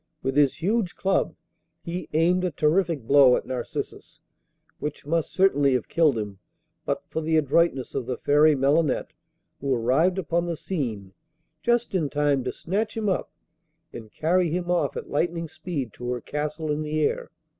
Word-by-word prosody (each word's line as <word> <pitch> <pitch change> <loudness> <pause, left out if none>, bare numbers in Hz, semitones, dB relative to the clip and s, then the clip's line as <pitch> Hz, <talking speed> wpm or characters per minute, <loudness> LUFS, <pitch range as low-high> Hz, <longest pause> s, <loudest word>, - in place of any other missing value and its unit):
With 135 0 -1
his 145 +2 +2
huge 205 -1 0
club 195 0 0 0.5
he 175 +1 -5
aimed 175 +4 +3
a 180 - +1
terrific 160 -1 +1
blow 135 0 +6
at - - -3
Narcissus, 125 -2 -5 0.6
which 150 -1 -5
must 165 +1 0
certainly 145 -8 +3
have 125 -3 -1
killed 155 -7 +3
him 105 -3 -5 0.5
but - - -1
for 160 - -3
the 160 0 +1
adroitness 145 -2 +2
of 120 - -3
the 125 -2 -2
Fairy 150 +1 +4
Melinette, 140 +2 +1 0.5
who 140 0 -2
arrived 135 +11 +2
upon 170 -1 0
the 170 -2 -2
scene 115 - -4 0.5
just 240 +3 +1
in 165 -6 0
time 145 -2 +1
to 125 - -1
snatch 210 +6 -3
him 215 -2 0
up 185 - -1 0.6
and 110 -3 -9
carry 175 - +1
him 175 +2 -2
off 175 - 0
at - - -7
lightning 165 +2 -1
speed 145 - -5
to 125 - -6
her 125 0 -1
castle 150 +3 -3
in 150 +1 -1
the 155 0 -2
air. - - 0
155 Hz, 170 wpm, -25 LUFS, 135-175 Hz, 0.6 s, blow